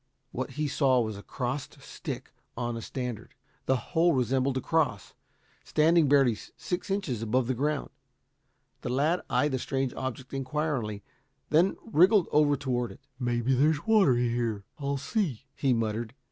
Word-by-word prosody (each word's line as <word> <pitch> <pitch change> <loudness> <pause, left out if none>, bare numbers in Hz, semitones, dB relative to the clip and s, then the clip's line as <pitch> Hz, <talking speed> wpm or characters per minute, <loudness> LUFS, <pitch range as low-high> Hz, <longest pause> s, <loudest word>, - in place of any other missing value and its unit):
What 130 +1 -4
he 150 0 0
saw 135 -2 +3
was 110 -3 -1
a 100 - -8
crossed 130 +4 -4
stick - - -7 0.3
on 120 -1 -2
a 115 - -5
standard. 125 0 -5 0.3
The 130 - +4
whole 170 +6 +2
resembled 130 +1 +1
a - - +1
cross, 130 - 0 0.5
standing 160 0 +4
barely 135 -4 +5 0.2
six 180 +2 -4
inches 190 - -1
above 120 +3 +1
the 130 - 0
ground. 145 +4 -1 0.9
The - - -4
lad 150 +8 +1
eyed 150 - +2
the 130 - -1
strange 135 0 -1
object 130 0 -5
inquiringly, 135 -6 -2 0.5
then 170 +5 +4
wriggled 195 -1 +5
over 150 -1 +4
toward 125 -4 -1
it. - - -14 0.2
"Maybe 120 0 +1
there's 145 +3 +2
water 205 - +5
here. 120 -3 0 0.2
I'll 140 0 -1
see," 140 - -2
he 135 -1 +1
muttered. 115 0 -1
130 Hz, 155 wpm, -28 LUFS, 120-150 Hz, 0.9 s, barely